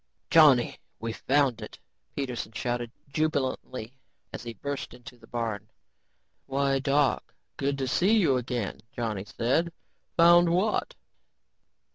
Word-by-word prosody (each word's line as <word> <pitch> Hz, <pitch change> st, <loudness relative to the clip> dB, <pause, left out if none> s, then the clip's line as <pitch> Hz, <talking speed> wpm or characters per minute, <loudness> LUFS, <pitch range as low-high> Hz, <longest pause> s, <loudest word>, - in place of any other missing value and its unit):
"Johnny, 145 Hz, -7 st, +6 dB, 0.2 s
we've 115 Hz, -1 st, -5 dB
found 135 Hz, -3 st, +3 dB
it," -, -, -9 dB, 0.4 s
Peterson 125 Hz, -5 st, -4 dB
shouted 120 Hz, -1 st, -2 dB, 0.2 s
jubilantly 135 Hz, -5 st, -2 dB, 0.4 s
as -, -, -5 dB
he 115 Hz, -1 st, -7 dB
burst 140 Hz, +1 st, -5 dB
into 125 Hz, 0 st, -12 dB
the 115 Hz, -2 st, -18 dB
barn. 110 Hz, -3 st, -4 dB, 0.8 s
"Why, 135 Hz, 0 st, +1 dB
Doc, 140 Hz, -1 st, +1 dB, 0.2 s
good 140 Hz, 0 st, -1 dB
to 135 Hz, -1 st, -2 dB
see 195 Hz, -, +3 dB
you 165 Hz, -10 st, +3 dB
again," 125 Hz, -4 st, -3 dB
Johnny 110 Hz, -5 st, -3 dB
said. 130 Hz, -, 0 dB, 0.5 s
"Found 170 Hz, 0 st, +7 dB
what?" 185 Hz, +6 st, 0 dB
130 Hz, 120 wpm, -27 LUFS, 120-145 Hz, 0.8 s, Found